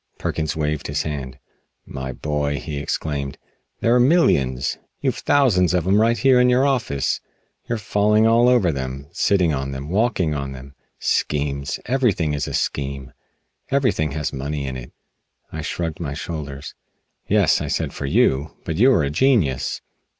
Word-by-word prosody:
Perkins 80 Hz, -1 st, -2 dB
waved 75 Hz, -1 st, -2 dB
his 70 Hz, 0 st, -1 dB
hand. 70 Hz, -4 st, -5 dB, 0.5 s
"My 65 Hz, -1 st, -5 dB
boy," 75 Hz, +1 st, -2 dB
he 75 Hz, +1 st, -5 dB
exclaimed, 70 Hz, -1 st, -3 dB, 0.4 s
"there 115 Hz, -, +3 dB
are 125 Hz, -, +5 dB
millions! 70 Hz, -, +2 dB, 0.2 s
You've -, -, -1 dB
thousands 95 Hz, -, +3 dB
of 85 Hz, -2 st, 0 dB
'em 100 Hz, +3 st, +4 dB
right 115 Hz, +1 st, +3 dB
here 130 Hz, -2 st, +4 dB
in 125 Hz, -, +4 dB
your 125 Hz, +2 st, +4 dB
office! 115 Hz, -, 0 dB, 0.5 s
You're 115 Hz, -, 0 dB
falling 105 Hz, +1 st, +2 dB
over 115 Hz, -4 st, +4 dB
them, 65 Hz, 0 st, -5 dB
sitting 90 Hz, -5 st, +2 dB
on 70 Hz, 0 st, -3 dB
them, 70 Hz, +2 st, -6 dB
walking 95 Hz, -5 st, +1 dB
on 70 Hz, -2 st, -4 dB
them! 65 Hz, +1 st, -11 dB, 0.2 s
Schemes? 70 Hz, -1 st, -1 dB
Everything 110 Hz, -, +1 dB
is 75 Hz, -1 st, -2 dB
a -, -, -5 dB
scheme. 70 Hz, -1 st, -3 dB, 0.6 s
Everything 125 Hz, -, +1 dB
has 75 Hz, -1 st, -3 dB
money 70 Hz, +1 st, -3 dB
in 65 Hz, -1 st, -4 dB
it!" 60 Hz, -1 st, -8 dB, 0.6 s
I -, -, -5 dB
shrugged 80 Hz, -2 st, -3 dB
my 70 Hz, -5 st, -4 dB
shoulders. 75 Hz, -3 st, -6 dB, 0.5 s
"Yes," -, -, +3 dB
I -, -, -3 dB
said, -, -, -2 dB
"for 70 Hz, -, -4 dB
you. 70 Hz, +2 st, +1 dB
But 80 Hz, -, -3 dB
you 125 Hz, +7 st, +6 dB
are 85 Hz, -, +3 dB
a 70 Hz, -, -1 dB
genius." 80 Hz, -, +1 dB
75 Hz, 160 wpm, -22 LUFS, 70-110 Hz, 0.6 s, you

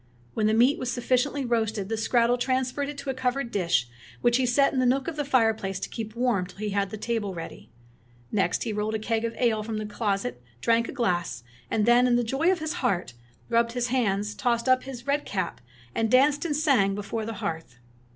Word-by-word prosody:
When 215 Hz, -1 st, +1 dB
the 215 Hz, -, +3 dB
meat 250 Hz, +6 st, +4 dB
was 250 Hz, -, -2 dB
suf 245 Hz, -1 st, -5 dB
ficiently 265 Hz, +1 st, +1 dB
roasted 220 Hz, -4 st, 0 dB
the 225 Hz, -, -3 dB
skrattel 235 Hz, +2 st, +2 dB
transferred 260 Hz, +2 st, 0 dB
it 290 Hz, -, -7 dB
to 280 Hz, -1 st, -3 dB
a -, -, -4 dB
covered 255 Hz, -1 st, -1 dB
dish, 170 Hz, -, +1 dB, 0.3 s
which 240 Hz, 0 st, +4 dB
he 260 Hz, -1 st, +1 dB
set 275 Hz, +3 st, +3 dB
in 260 Hz, -, +1 dB
a -, -, +2 dB
nook 265 Hz, +2 st, +1 dB
of 330 Hz, -, -3 dB
the 295 Hz, -, -1 dB
fireplace 225 Hz, -8 st, +1 dB
to -, -, -5 dB
keep 220 Hz, -1 st, -6 dB
warm 235 Hz, -7 st, +1 dB
till 180 Hz, -, -15 dB
he 210 Hz, 0 st, -3 dB
had 200 Hz, 0 st, 0 dB
the 215 Hz, -, -6 dB
table 210 Hz, -3 st, -2 dB
ready. 165 Hz, -7 st, -8 dB, 0.6 s
Next 200 Hz, -2 st, +1 dB
he 225 Hz, -, -3 dB
rolled 210 Hz, +1 st, -1 dB
a -, -, +2 dB
keg 225 Hz, +1 st, -1 dB
of 230 Hz, -, -3 dB
ale 230 Hz, -3 st, +2 dB
from 215 Hz, 0 st, -4 dB
the 215 Hz, -, -3 dB
closet, 195 Hz, -, -2 dB, 0.2 s
drank 230 Hz, -, +2 dB
a -, -, -3 dB
glass, 180 Hz, -, -1 dB, 0.3 s
and 215 Hz, -2 st, +1 dB
then, 240 Hz, +1 st, +5 dB
in 245 Hz, -, +3 dB
the 240 Hz, -, +2 dB
joy 270 Hz, +10 st, +2 dB
of 375 Hz, -, +1 dB
his 315 Hz, 0 st, -3 dB
heart, 180 Hz, -9 st, 0 dB, 0.3 s
rubbed 230 Hz, 0 st, +2 dB
his 245 Hz, 0 st, -1 dB
hands, 210 Hz, -5 st, 0 dB
tossed 235 Hz, +1 st, 0 dB
up 255 Hz, 0 st, +3 dB
his 255 Hz, -3 st, -8 dB
red 285 Hz, +1 st, +1 dB
cap, 185 Hz, -3 st, -3 dB, 0.3 s
and 225 Hz, 0 st, 0 dB
danced 280 Hz, +5 st, +4 dB
and 305 Hz, -3 st, 0 dB
sang 260 Hz, -11 st, +3 dB
before 205 Hz, +2 st, -4 dB
the 225 Hz, +1 st, -4 dB
hearth. 160 Hz, -, -5 dB
230 Hz, 230 wpm, -26 LUFS, 210-255 Hz, 0.6 s, then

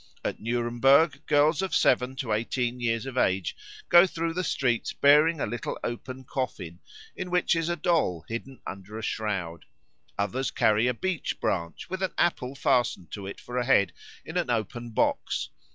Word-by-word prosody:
At -, -, -2 dB
Nuremberg 120 Hz, +6 st, +2 dB
girls 150 Hz, +2 st, +3 dB
of 190 Hz, -, -1 dB
seven 125 Hz, +1 st, +3 dB
to 130 Hz, -5 st, -2 dB
eighteen 120 Hz, +3 st, -1 dB
years 115 Hz, 0 st, -1 dB
of 130 Hz, -1 st, -2 dB
age 95 Hz, -2 st, +1 dB, 0.3 s
go 175 Hz, +2 st, +7 dB
through 165 Hz, -1 st, -2 dB
the 180 Hz, +2 st, -2 dB
streets 125 Hz, -7 st, 0 dB
bearing 150 Hz, +3 st, +5 dB
a -, -, 0 dB
little 120 Hz, -2 st, -4 dB
open 130 Hz, +2 st, -5 dB
coffin, 105 Hz, -10 st, -4 dB, 0.4 s
in 185 Hz, -, -5 dB
which 180 Hz, -1 st, +2 dB
is 165 Hz, 0 st, -1 dB
a 175 Hz, -, 0 dB
doll 150 Hz, -, 0 dB
hidden 125 Hz, +3 st, -6 dB
under 100 Hz, +3 st, -7 dB
a 110 Hz, -, -6 dB
shroud. 95 Hz, -8 st, -3 dB, 0.5 s
Others 115 Hz, +7 st, -1 dB
carry 110 Hz, +2 st, +3 dB
a 125 Hz, -, +1 dB
beech 185 Hz, +5 st, -2 dB
branch, 85 Hz, -3 st, -2 dB
with 185 Hz, +1 st, -5 dB
an 190 Hz, -, -2 dB
apple 140 Hz, -6 st, 0 dB
fastened 120 Hz, -, +1 dB
to 100 Hz, -2 st, -6 dB
it 100 Hz, -, -7 dB
for 125 Hz, +1 st, -4 dB
a -, -, +1 dB
head, 100 Hz, -8 st, +3 dB, 0.3 s
in -, -, -4 dB
an -, -, 0 dB
open 120 Hz, +1 st, -2 dB
box. 110 Hz, -, 0 dB
125 Hz, 175 wpm, -27 LUFS, 110-150 Hz, 0.5 s, go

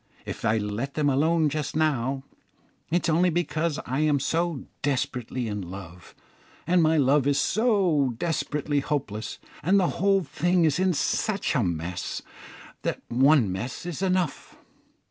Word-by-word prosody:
If -, -, -6 dB
I 110 Hz, +1 st, +2 dB
let 105 Hz, +6 st, -3 dB
them 150 Hz, -2 st, +2 dB
alone 160 Hz, +4 st, +3 dB
just 150 Hz, 0 st, -3 dB
now, 135 Hz, -4 st, 0 dB, 0.7 s
it 175 Hz, +2 st, +1 dB
is -, -, +1 dB
only 180 Hz, +3 st, +4 dB
because 165 Hz, -2 st, -1 dB
I 130 Hz, +3 st, -2 dB
am 150 Hz, -2 st, +3 dB
so 165 Hz, +1 st, -1 dB, 0.2 s
desperately 125 Hz, -3 st, -2 dB
in 105 Hz, -1 st, -3 dB
love, 90 Hz, -1 st, -10 dB, 0.5 s
and 175 Hz, 0 st, +3 dB
my 160 Hz, 0 st, +3 dB
love 140 Hz, 0 st, +3 dB
is 140 Hz, -1 st, +2 dB
so 185 Hz, -, +2 dB
desperately 150 Hz, -2 st, -1 dB
hopeless; 125 Hz, -7 st, -3 dB, 0.2 s
and 185 Hz, +6 st, +3 dB
the 180 Hz, -, +2 dB
whole 195 Hz, 0 st, +3 dB
thing 170 Hz, +4 st, +1 dB
is 155 Hz, +1 st, +2 dB
in 185 Hz, -1 st, +2 dB
such 205 Hz, +6 st, 0 dB
a 135 Hz, -, +2 dB
mess, 90 Hz, -1 st, -3 dB, 0.6 s
that -, -, -3 dB
one 130 Hz, -3 st, +4 dB
mess 120 Hz, -, -5 dB
is 175 Hz, 0 st, -5 dB
enough. 185 Hz, -4 st, -1 dB
150 Hz, 150 wpm, -26 LUFS, 125-170 Hz, 0.7 s, only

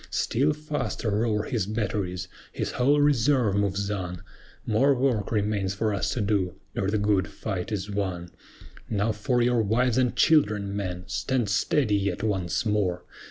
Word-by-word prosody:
Still 140 Hz, +6 st, +1 dB
faster 150 Hz, -6 st, -3 dB
roar 105 Hz, 0 st, +1 dB
his 110 Hz, -5 st, -2 dB
batteries, 100 Hz, -4 st, -2 dB, 0.2 s
his -, -, -3 dB
whole 140 Hz, +4 st, +3 dB
reserve 135 Hz, -5 st, +3 dB
moves 100 Hz, 0 st, 0 dB
on; 90 Hz, -4 st, -4 dB, 0.4 s
More 135 Hz, +6 st, +3 dB
work 125 Hz, -6 st, 0 dB
remains 105 Hz, -3 st, 0 dB
for 105 Hz, +1 st, 0 dB
us 100 Hz, -, -1 dB
to 120 Hz, -, -1 dB
do, 100 Hz, -4 st, 0 dB, 0.2 s
ere 95 Hz, -, -1 dB
the 110 Hz, -, +1 dB
good 100 Hz, -2 st, +2 dB
fight 95 Hz, -1 st, -5 dB
is 100 Hz, -2 st, -2 dB
won. 90 Hz, -4 st, -3 dB, 0.6 s
Now 105 Hz, +1 st, +1 dB
for 120 Hz, +3 st, 0 dB
your 120 Hz, -1 st, +3 dB
wives 120 Hz, +4 st, +2 dB
and 125 Hz, -2 st, +1 dB
children, 105 Hz, -11 st, +3 dB
men! 90 Hz, -3 st, -3 dB
Stand 120 Hz, +4 st, -1 dB
steady 105 Hz, +1 st, +2 dB
yet 100 Hz, -1 st, -2 dB
once 95 Hz, 0 st, -1 dB
more! 100 Hz, -5 st, 0 dB
105 Hz, 160 wpm, -26 LUFS, 100-120 Hz, 0.6 s, whole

